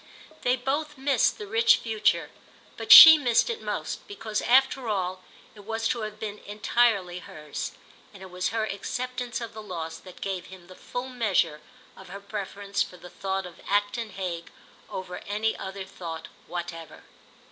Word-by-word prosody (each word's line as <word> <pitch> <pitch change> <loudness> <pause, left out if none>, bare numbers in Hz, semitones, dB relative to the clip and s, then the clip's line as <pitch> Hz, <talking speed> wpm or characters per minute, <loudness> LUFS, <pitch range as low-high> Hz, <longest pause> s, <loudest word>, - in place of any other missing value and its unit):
They 250 +1 +2
both 290 +4 -3
missed 270 -2 +2
the 210 - -7
rich 225 +3 +4
future, 220 -2 0 0.4
but - - -3
she 320 -1 +13
missed 245 - +2
it 465 - -6
most, - - -4
because 220 - -3
after 265 -1 +3
all 185 -2 -2 0.3
it 210 - -16
was 225 +2 -2
to 235 - -1
have 215 0 -6
been 210 -1 -5
entirely 205 -3 +1
hers; 150 -3 -7 0.4
and 195 -2 -13
it 190 - -11
was 180 0 -1
her 225 0 -1
acceptance 245 +4 -4
of 230 -1 -6
the 215 - -8
loss 165 -5 -6
that 185 +1 -14
gave 190 -2 -4
him 185 -2 -13
the 185 - -14
full 250 +6 -6
measure 195 -11 0 0.3
of 190 -1 -13
her 200 +2 -7
preference 200 0 -4
for 180 - -3
the 180 +1 -13
thought 190 -1 -3
of 175 -2 -12
Acton 205 +3 0
Hague 180 -3 -5 0.4
over 185 -1 -6
any 215 +2 0
other 190 0 -6
thought 165 -4 -8 0.2
whatever. 170 -2 -7
205 Hz, 170 wpm, -26 LUFS, 185-230 Hz, 0.4 s, she